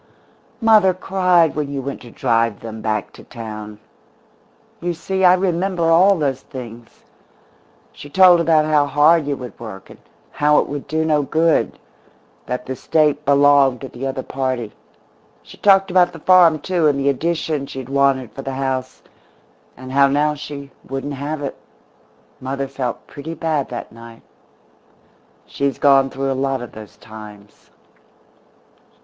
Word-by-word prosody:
"Mother 215 Hz, -5 st, +5 dB
cried 180 Hz, -3 st, +2 dB
when 150 Hz, -2 st, -2 dB
you 140 Hz, -, -3 dB
went 135 Hz, +1 st, -6 dB
to 120 Hz, -, -12 dB
drive 115 Hz, -2 st, 0 dB
them 110 Hz, -1 st, -8 dB
back 110 Hz, -2 st, -2 dB
to -, -, -14 dB
town. 110 Hz, -3 st, -8 dB, 1.0 s
You 175 Hz, 0 st, -3 dB
see, 190 Hz, +3 st, -3 dB
I 180 Hz, 0 st, +7 dB
remember 185 Hz, -1 st, -1 dB
all 190 Hz, +4 st, +5 dB
those 135 Hz, -4 st, -1 dB
things. 120 Hz, -2 st, -11 dB, 0.9 s
She 145 Hz, -, -12 dB
told 180 Hz, +2 st, +6 dB
about 160 Hz, -2 st, +3 dB
how 150 Hz, -2 st, +2 dB
hard 150 Hz, +2 st, +3 dB
you 140 Hz, -1 st, -2 dB
would 125 Hz, -2 st, -10 dB
work, 105 Hz, -5 st, -10 dB
and -, -, -15 dB, 0.3 s
how 150 Hz, 0 st, +2 dB
it -, -, +2 dB
would 145 Hz, 0 st, -6 dB
do 160 Hz, +2 st, -1 dB
no 150 Hz, -2 st, +2 dB
good 160 Hz, +3 st, +1 dB, 0.7 s
that 125 Hz, 0 st, -4 dB
the 130 Hz, -, -5 dB
State 150 Hz, +1 st, +1 dB
belonged 140 Hz, -2 st, +4 dB
to 135 Hz, -, -7 dB
the 135 Hz, +2 st, -6 dB
other 135 Hz, -1 st, -4 dB
party. 130 Hz, -5 st, -3 dB, 0.7 s
She -, -, -15 dB
talked 195 Hz, -1 st, +4 dB
about 180 Hz, -1 st, +3 dB
the 165 Hz, -, -10 dB
farm, 175 Hz, -1 st, +5 dB
too, 175 Hz, -3 st, +1 dB
and 140 Hz, -2 st, +1 dB
the 140 Hz, -, -1 dB
addition 155 Hz, 0 st, -2 dB
she -, -, -10 dB
had 130 Hz, -2 st, -6 dB
wanted 135 Hz, -3 st, +1 dB
for 135 Hz, -, -8 dB
the 135 Hz, 0 st, -5 dB
house, 130 Hz, -1 st, -3 dB, 0.7 s
and 130 Hz, +1 st, -9 dB
how 140 Hz, +1 st, +4 dB
now 145 Hz, +2 st, +1 dB
she 140 Hz, -1 st, -8 dB
wouldn't 135 Hz, +2 st, -5 dB
have 145 Hz, +2 st, -5 dB
it. 140 Hz, -, -4 dB, 0.8 s
Mother 135 Hz, +1 st, -4 dB
felt 130 Hz, -3 st, -5 dB
pretty 155 Hz, +3 st, -8 dB
bad 155 Hz, -5 st, -2 dB
that 120 Hz, -, -7 dB
night. 115 Hz, 0 st, -14 dB, 1.2 s
She's 140 Hz, -1 st, -2 dB
gone 135 Hz, -1 st, +4 dB
through 135 Hz, 0 st, -3 dB
a -, -, +1 dB
lot 135 Hz, 0 st, -1 dB
of 120 Hz, -, -9 dB
those 105 Hz, -3 st, -12 dB
times." 105 Hz, -2 st, -14 dB
140 Hz, 160 wpm, -19 LUFS, 130-160 Hz, 1.2 s, I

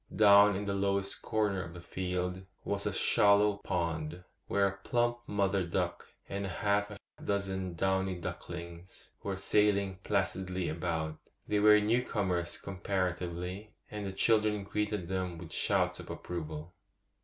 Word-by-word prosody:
Down 100 Hz, -1 st, +7 dB
in 100 Hz, +2 st, -3 dB
the 100 Hz, -, -1 dB
lowest 100 Hz, 0 st, 0 dB
corner 105 Hz, -3 st, 0 dB
of 85 Hz, -, -7 dB
the 85 Hz, -, -8 dB
field 90 Hz, +1 st, -3 dB, 0.2 s
was -, -, -1 dB
a -, -, 0 dB
shallow 100 Hz, 0 st, +4 dB
pond, 85 Hz, -2 st, -2 dB, 0.2 s
where 100 Hz, -1 st, +3 dB
a 95 Hz, 0 st, -4 dB
plump 120 Hz, +2 st, 0 dB
mother 100 Hz, -1 st, +1 dB
duck 85 Hz, -, -2 dB, 0.2 s
and 100 Hz, 0 st, -3 dB
half 100 Hz, +2 st, +1 dB
a 105 Hz, -, -8 dB, 0.3 s
dozen 95 Hz, -3 st, -1 dB
downy 95 Hz, +1 st, +1 dB
ducklings 85 Hz, 0 st, -8 dB
were 100 Hz, -, -2 dB
sailing 100 Hz, -1 st, +2 dB
placidly 95 Hz, -1 st, -1 dB
about. 80 Hz, -2 st, -2 dB, 0.3 s
They 105 Hz, -, +2 dB
were 105 Hz, 0 st, +7 dB
new 110 Hz, +4 st, +2 dB
comers 90 Hz, -7 st, -1 dB
comparatively, 90 Hz, +1 st, -3 dB, 0.2 s
and 105 Hz, -1 st, -4 dB
the -, -, -3 dB
children 105 Hz, +1 st, +2 dB
greeted 105 Hz, -2 st, -2 dB
them 90 Hz, -2 st, -2 dB
with 80 Hz, -1 st, -9 dB
shouts -, -, +1 dB
of -, -, -9 dB
approval. 80 Hz, -1 st, -6 dB
95 Hz, 145 wpm, -32 LUFS, 90-100 Hz, 0.3 s, Down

